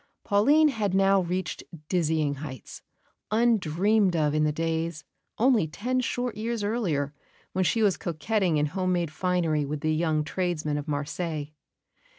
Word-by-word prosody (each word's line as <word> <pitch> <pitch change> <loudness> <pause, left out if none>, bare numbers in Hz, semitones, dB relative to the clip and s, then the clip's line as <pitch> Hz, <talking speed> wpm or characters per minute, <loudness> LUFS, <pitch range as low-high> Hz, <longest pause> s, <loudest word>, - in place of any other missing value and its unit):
Pauline 285 +10 +4
had 210 -8 -1
now 195 0 +4
reached 180 +1 -3 0.2
dizzy 160 -4 +1
heights, 135 -3 -8 0.5
undreamed 210 -3 +2
of 150 -2 +1
in 155 0 +2
the 150 - +2
days, 165 0 -2 0.3
only 235 -8 +3
ten 245 +11 -2
short 245 -1 -2
years 225 0 -3
earlier, 175 - -1 0.4
when 185 - +1
she 225 +5 +2
was 200 -3 +3
coquetting 175 +1 0
in 150 - +2
home 185 +4 -1
made 170 -3 -1
finery 170 -4 0
with 145 +1 -4
the 155 0 +1
young 155 -1 +1
tradesmen 155 -3 -2
of 145 - -7
Marseilles. 150 +1 -3
175 Hz, 150 wpm, -27 LUFS, 155-205 Hz, 0.5 s, Pauline